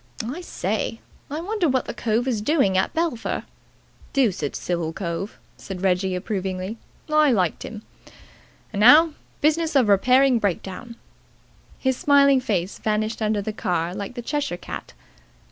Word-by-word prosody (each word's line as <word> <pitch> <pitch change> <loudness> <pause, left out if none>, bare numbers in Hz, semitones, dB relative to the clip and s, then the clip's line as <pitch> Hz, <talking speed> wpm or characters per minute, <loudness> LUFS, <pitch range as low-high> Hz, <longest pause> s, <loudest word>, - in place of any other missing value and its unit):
I 275 +10 -5
say, 220 - -3 0.3
I 300 +3 -4
wonder 385 -2 0
what 260 -1 +1
the - - -5
cove 230 +2 0
is 230 -5 0
doing 215 -6 +2
at 190 - +2
Belpher? 320 -8 -1 0.7
Deuced 205 - +1
civil 170 -2 -2
cove," 175 +3 -4 0.2
said 190 -1 -7
Reggie 185 0 +1
approvingly. 190 +2 -3 0.3
"I 305 -2 +4
liked 185 -8 +1
him. 215 -1 -7 0.9
And 200 - -2
now, 300 +9 +7 0.3
business 315 +1 +2
of 250 -6 +4
repairing 250 +5 +5
breakdown." 200 +4 -3 0.8
His 260 -2 0
smiling 280 -2 +5
face 190 -5 -2
vanished 215 +1 -1
under 215 -1 0
the 215 - -3
car 175 -5 -1
like 200 +4 -6
the 240 - -5
Cheshire 285 -9 -2
cat. - - -8
220 Hz, 145 wpm, -23 LUFS, 190-275 Hz, 0.9 s, now